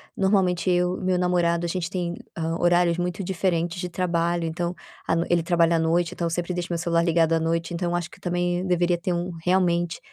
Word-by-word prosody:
normalmente 190 -4 +2
eu 180 0 +1
e - - -8
meu 185 -1 +1
namorado 175 -1 +1
a - - -2
gente 175 -1 -2
tem, 175 -3 -2 0.2
ah, 165 +1 -2
horários 175 -1 +3
muito 180 +3 -2
diferentes 175 -1 -1
de 180 - -3
trabalho, 170 -1 0
então, 170 +2 -3 0.3
a 165 - +2
noi 170 +1 0
ele 170 -2 +2
trabalha 170 -1 +3
à - - +1
noite, 165 +1 +1
então 170 -1 -2
sempre 175 +2 -2
deixo 175 0 -3
o 175 - -2
meu - - 0
celular 170 0 +1
ligado 165 -1 +2
à 165 - +3
noite, 165 +1 -1
então 175 0 -1
acho 175 -1 -2
que - - -15
também 175 0 -1
deveria 175 0 +2
ter 175 +1 -2
um, 175 +1 -2
realmente, 175 -2 +1
175 Hz, 225 wpm, -24 LUFS, 170-180 Hz, 0.3 s, horários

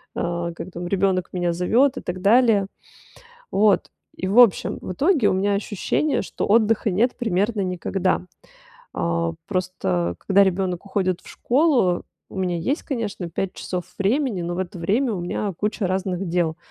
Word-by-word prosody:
э, 170 0 -2
как 185 - -7
там 175 0 -5
ребёнок 185 -1 +1
меня 175 -1 0
зовёт 235 +11 +2
и - - -4
так 180 +1 -5
далее. 215 -1 +4 0.8
Вот. 205 -1 +3 0.3
И 185 - -3
в 205 +6 +4
общем, 235 -6 +5
в - - -5
итоге 285 - +3
у - - +1
меня 200 +2 +1
ощущение, 205 +9 0
что - - -4
отдыха 220 0 +3
нет 225 +7 +1
примерно 210 -1 0
никогда. 185 0 -1 0.7
Э, 85 -1 -1
просто 135 - -1
когда 200 +1 +4
ребёнок 190 -1 -1
уходит 185 -3 -1
в - - -18
школу, 250 - +2 0.3
у - - -9
меня 180 -2 0
есть, 265 - -1
конечно, 220 - -4
5 185 +3 -3
часов 180 -1 -4
времени, 220 0 0
но 175 +1 -3
в 185 - -4
это 185 0 -4
время 220 +9 +1
у 185 - -3
меня 195 +3 -2
куча 210 -1 -1
разных 185 0 -2
дел. 170 -2 0
190 Hz, 165 wpm, -23 LUFS, 175-215 Hz, 0.8 s, общем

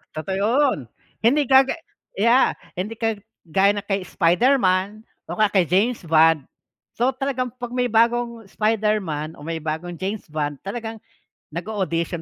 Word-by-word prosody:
Totoo 190 +5 -3
yun, 250 - +2 0.4
hindi 275 +7 +3
gaga 265 +2 +5 0.4
yeah, 235 +6 +4 0.2
hindi 205 +5 -3
kag 225 -2 -1 0.3
gaya 195 +5 +3
ng 205 - -3
kay 195 -1 -1
Spider-Man 195 +1 +2 0.3
o - - -3
kaya 215 -2 +3
kay 190 -3 +4
James 215 +7 +2
Bond. 160 -2 +4 0.5
So, 245 +3 +2
talagang 255 -2 -2
'pag 245 -1 -4
may 250 -1 +1
bagong 235 -1 +1
Spider-Man 210 -9 -1
o - - -12
may 165 0 -3
bagong 160 +3 -4
James 195 +4 -3
Bond 145 -2 -2
talagang 225 +2 -5 0.5
nag-o-audition 170 -1 -3
205 Hz, 145 wpm, -22 LUFS, 175-235 Hz, 0.5 s, gaga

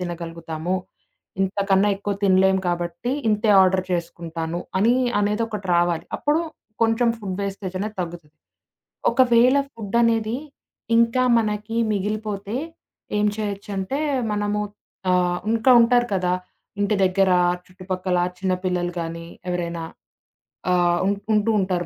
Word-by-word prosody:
తినగలుగుతాము? 170 -1 -4 0.7
ఇంతకన్నా 195 +1 +2
ఎక్కువ 200 0 -3
తినలేము 190 0 +4
కాబట్టి, 175 +7 -2 0.2
ఇంతే 210 +1 +2
ఆర్డర్ 185 0 +2
చేసుకుంటాను 170 -1 -3 0.2
అని 230 +5 +4 0.3
అనేది 210 +2 +1
ఒకటి 210 -3 -5
రావాలి. 175 -1 +1
అప్పుడు 300 +3 +1 0.4
కొంచెం 225 +1 +3
ఫుడ్ 190 -3 -5
వేస్టేజ్ 195 -1 -4
అనేది 210 +1 -4
తగ్గుతది. 165 -3 -7 0.8
ఒకవేళ 250 +1 +5 0.2
ఫుడ్ 220 -1 -4
అనేది 225 0 +1 0.6
ఇంకా 235 +2 +3 0.2
మనకి 215 0 -2 0.2
మిగిలిపోతే 210 +1 -3 0.6
ఏం 210 - +2
చేయొచ్చంటే, 200 +3 -3 0.3
మనము 205 0 -1 0.5
ఆహ్, 180 -1 +2
ఇంకా 230 +3 +3
ఉంటారు 240 +1 +4
కదా, 180 -1 +1 0.5
ఇంటి 205 +1 +2
దగ్గర 190 +1 +3 0.4
చుట్టుపక్కల, 185 0 -3 0.2
చిన్నపిల్లలు 180 -1 -1
గానీ, 165 0 -5 0.2
ఎవరైనా 170 -1 -2 0.9
ఆహ్, 175 -1 +3
ఉన్ 200 +1 +2 0.2
ఉంటూ 210 +1 +2
ఉంటారు 185 -2 -1
195 Hz, 115 wpm, -23 LUFS, 175-215 Hz, 0.9 s, ఒకవేళ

